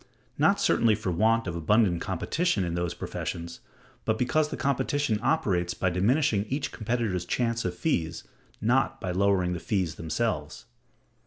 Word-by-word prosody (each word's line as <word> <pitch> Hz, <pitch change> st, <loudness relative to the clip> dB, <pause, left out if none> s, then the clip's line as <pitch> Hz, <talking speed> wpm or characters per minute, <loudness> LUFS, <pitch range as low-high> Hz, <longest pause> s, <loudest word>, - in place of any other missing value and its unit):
Not -, -, +3 dB
certainly 115 Hz, -2 st, +3 dB
for 95 Hz, -, -3 dB
want 110 Hz, +6 st, +2 dB
of 85 Hz, -2 st, -3 dB
abundant 90 Hz, +1 st, +2 dB
competition 170 Hz, -, 0 dB
in 85 Hz, -1 st, -2 dB
those 85 Hz, 0 st, -2 dB
professions, 85 Hz, 0 st, -5 dB, 0.4 s
but 110 Hz, -, 0 dB
because 150 Hz, +5 st, +1 dB
the -, -, -5 dB
competition 140 Hz, -3 st, 0 dB
operates 90 Hz, -, +1 dB
by 95 Hz, -, 0 dB
diminishing 105 Hz, -, +2 dB
each 135 Hz, +5 st, -3 dB
competitor's 110 Hz, -5 st, -1 dB
chance 115 Hz, +4 st, -1 dB
of 90 Hz, -1 st, -2 dB
fees, 85 Hz, -, -1 dB, 0.4 s
not 135 Hz, +4 st, +1 dB
by 90 Hz, -, -3 dB
lowering 95 Hz, -1 st, +2 dB
the 85 Hz, -, -3 dB
fees 90 Hz, -3 st, -1 dB
themselves. 80 Hz, -1 st, -2 dB
105 Hz, 150 wpm, -27 LUFS, 90-125 Hz, 0.4 s, Not